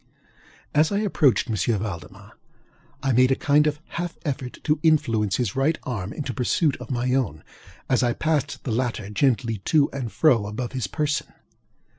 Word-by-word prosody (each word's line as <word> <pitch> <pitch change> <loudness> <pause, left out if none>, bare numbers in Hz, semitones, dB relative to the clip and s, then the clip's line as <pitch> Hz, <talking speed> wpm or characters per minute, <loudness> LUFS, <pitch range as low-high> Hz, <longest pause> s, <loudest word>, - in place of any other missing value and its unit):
As 155 +4 +3
I 200 - +1
approached 175 - +2
M. 110 - -1 0.2
Valdemar 100 0 -7 0.7
I 135 - +2
made 130 +1 +5
a - - +4
kind 150 +2 +3
of 150 0 -1
half 175 0 -4
effort 130 -4 -3
to 150 -1 +1
influence 115 - +2
his 120 -6 -1
right 140 +4 +2
arm 105 -6 -4
into 135 -2 -4
pursuit 135 +5 +1
of 125 -2 -10
my 125 0 0
own, 100 - -1 0.4
as 130 -2 +2
I 120 -1 +2
passed 150 -2 -1
the 125 - -3
latter 110 -3 -2
gently 115 -1 +1
to 150 -3 +3
and 130 -5 -4
fro 120 -10 +3
above 120 +4 -4
his 130 -7 -2
person. 150 - -1
130 Hz, 170 wpm, -24 LUFS, 110-150 Hz, 0.7 s, made